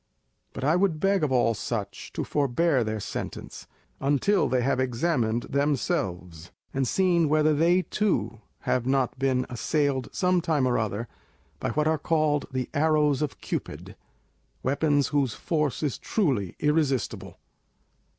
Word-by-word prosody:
But - - -6
I 150 +4 +3
would 180 -4 +1
beg 195 -1 +2
of 145 - +1
all 120 -2 +3
such 105 -1 -5
to - - -2
forbear 145 0 +1
their 110 0 -3
sentence, - - -6 0.3
until 145 +8 +2
they 125 -1 +1
have 135 0 +1
examined 120 -2 0
themselves 95 - -2 0.2
and 135 -1 0
seen 175 -3 +2
whether 155 0 +3
they 170 +5 +3
too 120 - -1 0.2
have 125 -1 0
not 130 -1 0
been 130 -1 +1
assailed 135 +1 -1
some 180 -2 +1
time 160 -6 +1
or 120 - +1
other 110 +1 -2 0.5
by - - -2
what 150 0 +1
are 160 -1 +1
called 155 -2 +1
the 130 -1 -2
arrows 150 -1 +2
of 150 - -3
Cupid, - - -5 0.7
weapons 145 +1 +1
whose 140 -5 0
force 150 -4 -1
is 145 - -1
truly 130 - 0
irresistible. 150 -5 0
140 Hz, 140 wpm, -26 LUFS, 125-155 Hz, 0.7 s, I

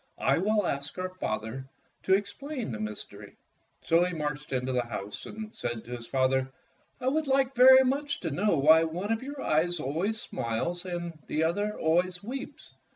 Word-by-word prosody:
I - - +2
will 210 +2 +2
ask 140 0 -3
our 185 0 -3
father 115 -4 -4 0.3
to 190 - +4
explain 240 - -4
the 110 - -5
mys 105 -1 -4
tery." 105 0 -13 0.5
So 165 +1 +4
he 180 -1 -1
marched 150 -1 -4
into 130 0 -1
the 125 -1 +1
house 105 -3 -6
and 215 0 -7
said 120 -2 -4
to 125 +1 -5
his 115 -1 -9
father, 130 0 +1 0.5
"I 255 - -3
would 305 +4 +1 0.3
very 260 +1 +8
much 280 0 -1
like 165 - -1
to - - -3
know 205 +3 +2
why 160 +4 +6
one 175 +6 -3
of 225 - 0
yom* 280 +2 -6
eyes 170 -1 +1
always 170 +11 -1
smiles 175 - -3
and 175 -3 -5
the 155 - 0
other 205 +6 0
always 175 +3 +1
weeps." 265 +5 -7
170 Hz, 185 wpm, -29 LUFS, 130-210 Hz, 0.5 s, very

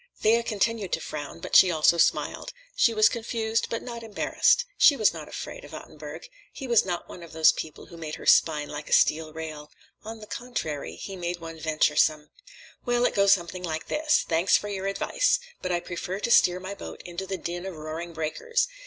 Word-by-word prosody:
Thea 230 +2 +4
continued 215 -2 -1
to - - +1
frown, 150 +2 -7
but - - -4
she 185 - +8
also 170 0 +3
smiled. - - +1 0.2
She 235 - +4
was 215 -1 +5
confused, 225 -1 -1
but 230 - -3
not 235 -1 -7
embarrassed. 225 - +2
She 285 - +6
was 215 - +3
not - - -8
afraid - - -7
of - - -10
Ottenburg. - - -9 0.2
He 270 - -8
was 235 -3 +4
not 175 -2 -4
one 180 - -10
of 170 -2 -12
those 160 0 +6
people 155 - -7
who 170 - -13
made 155 -2 -5
her - - -11
spine 150 -2 +4
like 150 0 -7
a - - 0
steel 155 0 +3
rail. 155 -2 -7 0.3
On 220 +1 -8
the 215 - -10
contrary, 205 - -5
he 195 - -7
made 175 -1 -3
one 165 -1 -9
venturesome. 155 -1 +1 0.5
"Well, 245 0 +1
it - - +1
goes 200 -1 +5
something 180 0 -3
like 160 -3 -4
this: 305 0 +2
_Thanks 165 +3 +3
for 205 - -6
your 195 -1 -3
advice! - - +1 0.2
But 185 - -3
I 175 - +1
prefer 180 +2 -5
to 235 - -1
steer 180 -5 +5
my 190 +2 -6
boat - - -9
into 175 +2 -6
the 190 0 -3
din 175 +2 -5
of 190 - -6
roaring 160 +2 -6
breakers. 170 - -1
180 Hz, 205 wpm, -26 LUFS, 160-225 Hz, 0.5 s, she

